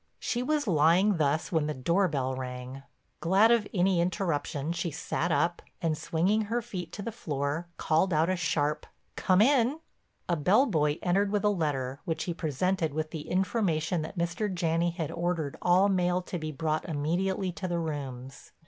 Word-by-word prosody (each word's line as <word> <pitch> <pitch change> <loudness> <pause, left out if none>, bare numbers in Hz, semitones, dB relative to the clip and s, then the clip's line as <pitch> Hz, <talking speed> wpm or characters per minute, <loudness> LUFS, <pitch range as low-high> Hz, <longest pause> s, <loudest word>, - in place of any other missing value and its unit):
She 240 - -2
was 295 +3 0
lying 175 +3 +4
thus 150 +1 0
when 160 -3 +1
the 150 - -2
door 170 +9 +2
bell 135 -5 -1
rang. 130 +1 -6 0.4
Glad 195 +7 +4
of 230 -3 +3
any 185 -2 +2
interruption 165 -4 -1
she 170 0 -2
sat 165 +2 -2
up, 170 +1 +1 0.2
and, 165 -3 0
swinging 180 +7 +1
her 230 +4 -1
feet 185 -8 -6
to 200 - -6
the 230 - -3
floor, 150 -4 -3
called 160 +4 +2
out 160 0 +3
a 185 - +1
sharp 150 -4 -1 0.3
"Come 185 +1 +3
in." 270 +2 +3 0.5
A 175 - +1
bell 185 - +4
boy 150 - +1
entered 195 +3 +2
with 205 -1 0
a 210 - +4
letter 140 -8 -1
which 165 - -2
he 175 - -2
presented 165 0 -1
with 155 0 -2
the 155 -3 -6
information 180 -4 0
that 160 +5 -7
Mr. 175 +5 -1
Janney 170 -1 +1
had 165 -3 -4
ordered 170 -4 -2
all 180 +3 +4
mail 180 -2 +1
to 175 - -5
be 155 0 -4
brought 155 +3 -2
immediately 180 +5 -1
to 185 +2 -5
the 175 -1 -1
rooms. 135 -5 -6
170 Hz, 180 wpm, -29 LUFS, 155-190 Hz, 0.5 s, lying